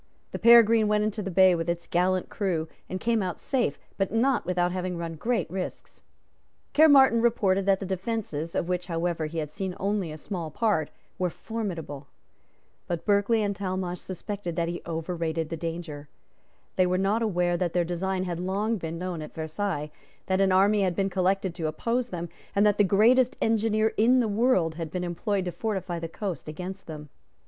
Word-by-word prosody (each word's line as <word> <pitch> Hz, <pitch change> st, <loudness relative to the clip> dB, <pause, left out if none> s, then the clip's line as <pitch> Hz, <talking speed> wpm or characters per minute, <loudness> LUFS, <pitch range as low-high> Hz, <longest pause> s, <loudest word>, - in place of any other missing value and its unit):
The -, -, -5 dB
Peregrine 230 Hz, -2 st, +7 dB
went 210 Hz, 0 st, +2 dB
into 215 Hz, 0 st, -2 dB
the 195 Hz, -, -4 dB
bay 185 Hz, 0 st, +6 dB
with 165 Hz, 0 st, -2 dB
its 170 Hz, 0 st, -2 dB
gallant 185 Hz, +1 st, +1 dB
crew, 175 Hz, -6 st, -2 dB, 0.2 s
and 185 Hz, -, -3 dB
came 230 Hz, 0 st, +1 dB
out 180 Hz, -3 st, -3 dB
safe, 260 Hz, -3 st, 0 dB, 0.2 s
but 195 Hz, -2 st, 0 dB
not 245 Hz, +4 st, +1 dB
without 180 Hz, -1 st, +1 dB
having 180 Hz, -1 st, -3 dB
run 170 Hz, -1 st, -4 dB
great 220 Hz, +2 st, -1 dB
risks. 185 Hz, +1 st, -6 dB, 0.7 s
Caermarthen 275 Hz, -6 st, +6 dB
reported 195 Hz, -5 st, +2 dB
that 195 Hz, -1 st, +4 dB
the 195 Hz, -, -4 dB
defences, 190 Hz, -4 st, -3 dB
of 170 Hz, -, 0 dB
which 180 Hz, 0 st, -2 dB
however 165 Hz, -2 st, -1 dB
he 165 Hz, +2 st, -7 dB
had 150 Hz, -2 st, -3 dB
seen 190 Hz, 0 st, -4 dB
only 195 Hz, -4 st, -1 dB
a 155 Hz, -, -7 dB
small 170 Hz, -1 st, -5 dB
part, 195 Hz, -4 st, 0 dB, 0.3 s
were 180 Hz, -1 st, +1 dB
formidable. 170 Hz, -10 st, -5 dB, 0.8 s
But 170 Hz, -2 st, -3 dB
Berkeley 210 Hz, +2 st, +3 dB
and 200 Hz, -1 st, -1 dB
Talmash 185 Hz, -2 st, -3 dB
suspected 190 Hz, -1 st, -5 dB
that 170 Hz, 0 st, 0 dB
he 175 Hz, +1 st, -4 dB
overrated 165 Hz, -1 st, -2 dB
the 165 Hz, -, -3 dB
danger. 165 Hz, -3 st, -6 dB, 0.7 s
They 185 Hz, -1 st, +4 dB
were 180 Hz, 0 st, +1 dB
not 200 Hz, +4 st, +1 dB
aware 180 Hz, -5 st, +1 dB
that 175 Hz, -1 st, -1 dB
their 175 Hz, -1 st, +2 dB
design 185 Hz, +2 st, -2 dB
had 175 Hz, -2 st, -3 dB
long 200 Hz, +5 st, -1 dB
been 165 Hz, -2 st, -5 dB
known 180 Hz, -2 st, -4 dB
at 150 Hz, -, -9 dB
Versailles, 160 Hz, -1 st, -3 dB, 0.3 s
that 190 Hz, 0 st, +1 dB
an 195 Hz, -1 st, +3 dB
army 200 Hz, +3 st, +4 dB
had 185 Hz, -3 st, +1 dB
been 195 Hz, +1 st, 0 dB
collected 190 Hz, 0 st, +1 dB
to 165 Hz, -2 st, -3 dB
oppose 235 Hz, +9 st, -1 dB
them, 175 Hz, -3 st, -4 dB, 0.3 s
and 200 Hz, +1 st, +4 dB
that 210 Hz, 0 st, +3 dB
the -, -, +7 dB
greatest 240 Hz, +7 st, +4 dB
engineer 220 Hz, 0 st, +2 dB
in 245 Hz, +4 st, +5 dB
the 235 Hz, -, +2 dB
world 205 Hz, -6 st, +2 dB
had 160 Hz, -, -3 dB
been 180 Hz, +3 st, -3 dB
employed 185 Hz, +3 st, -1 dB
to 180 Hz, -, -2 dB
fortify 185 Hz, -2 st, -3 dB
the 165 Hz, -, -4 dB
coast 190 Hz, -2 st, -5 dB
against 180 Hz, +5 st, -7 dB
them. 150 Hz, -2 st, -8 dB
185 Hz, 190 wpm, -27 LUFS, 170-210 Hz, 0.8 s, Peregrine